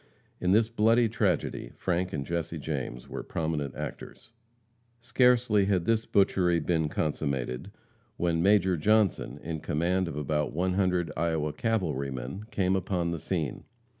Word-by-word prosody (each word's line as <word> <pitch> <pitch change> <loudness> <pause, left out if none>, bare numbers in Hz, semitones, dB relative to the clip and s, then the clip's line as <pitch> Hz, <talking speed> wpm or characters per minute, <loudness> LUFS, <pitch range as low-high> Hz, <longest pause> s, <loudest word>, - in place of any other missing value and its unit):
In 90 - 0
this 110 +4 +4
bloody 115 +1 +3
tragedy, 95 - -1
Frank 90 0 -1
and 70 -3 -3
Jesse 85 +1 -3
James 65 -5 -4
were - - -5
prominent 75 -4 -3
actors. - - -8 0.7
Scarcely 120 -3 +3
had 95 -3 +1
this 115 -1 +1
butchery 90 -3 +3
been 80 -1 0
consummated, 70 -1 -2 0.5
when 85 -1 +1
Major 95 -1 +4
Johnson, 105 +4 +2
in 80 -1 -4
command 85 +5 0
of 75 - -5
about 75 0 -1
100 90 0 +1
Iowa 80 -2 0
cavalrymen, 75 - -2
came 95 -3 +1
upon 90 -2 -1
the 85 - -3
scene. 80 -4 -3
85 Hz, 135 wpm, -28 LUFS, 75-100 Hz, 0.7 s, this